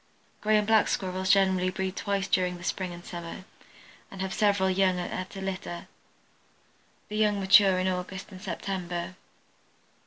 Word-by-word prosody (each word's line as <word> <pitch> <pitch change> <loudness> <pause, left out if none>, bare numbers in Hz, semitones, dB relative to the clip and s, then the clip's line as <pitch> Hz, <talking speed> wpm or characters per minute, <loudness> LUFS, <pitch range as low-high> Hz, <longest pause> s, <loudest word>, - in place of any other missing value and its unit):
Gray 215 0 +3
and 210 - +1
Black 220 -1 +4
Squirrels 185 0 -2
generally 190 -2 +4
breed 190 0 -3
twice 200 -1 -1
during 180 -1 +1
the 175 - -11
spring 185 0 -2
and 175 0 -10
summer, 170 +1 -7 0.7
and 195 - -10
have 190 0 -2
several 200 -2 +2
young 185 -1 +2
at 185 +2 -5
a 195 - -6
litter. 185 -2 -5 1.2
The 210 - -4
young 210 -1 +2
mature 195 -1 +6
in 185 0 0
August 185 +1 -4
and 185 -1 -10
September. 180 -2 -4
190 Hz, 155 wpm, -28 LUFS, 185-195 Hz, 1.2 s, mature